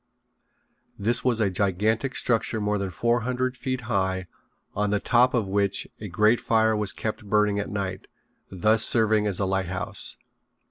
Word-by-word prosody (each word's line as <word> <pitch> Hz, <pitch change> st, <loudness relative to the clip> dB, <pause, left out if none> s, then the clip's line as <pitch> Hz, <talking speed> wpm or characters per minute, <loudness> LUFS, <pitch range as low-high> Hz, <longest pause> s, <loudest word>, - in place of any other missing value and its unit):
This 115 Hz, +4 st, +2 dB
was 125 Hz, -3 st, +2 dB
a 100 Hz, -3 st, +1 dB
gigantic 105 Hz, +7 st, 0 dB
structure 115 Hz, -1 st, 0 dB
more 105 Hz, 0 st, 0 dB
than 100 Hz, -1 st, -2 dB
four 120 Hz, +7 st, +1 dB
hundred 125 Hz, +2 st, -2 dB
feet 130 Hz, 0 st, -3 dB
high 95 Hz, -5 st, -1 dB, 0.5 s
on 105 Hz, 0 st, 0 dB
the 105 Hz, 0 st, +1 dB
top 125 Hz, +4 st, +3 dB
of 115 Hz, -4 st, +1 dB
which 100 Hz, 0 st, 0 dB
a 105 Hz, -, -6 dB
great 105 Hz, +6 st, +3 dB
fire 110 Hz, -1 st, +2 dB
was 105 Hz, -2 st, 0 dB
kept 110 Hz, 0 st, -4 dB
burning 105 Hz, -1 st, +2 dB
at 100 Hz, -, -3 dB
night, 95 Hz, -2 st, -4 dB, 0.4 s
thus 105 Hz, +4 st, +2 dB
serving 110 Hz, -2 st, +3 dB
as 100 Hz, -3 st, -2 dB
a 100 Hz, -, +1 dB
lighthouse. 95 Hz, +1 st, -2 dB
105 Hz, 165 wpm, -25 LUFS, 100-115 Hz, 0.5 s, top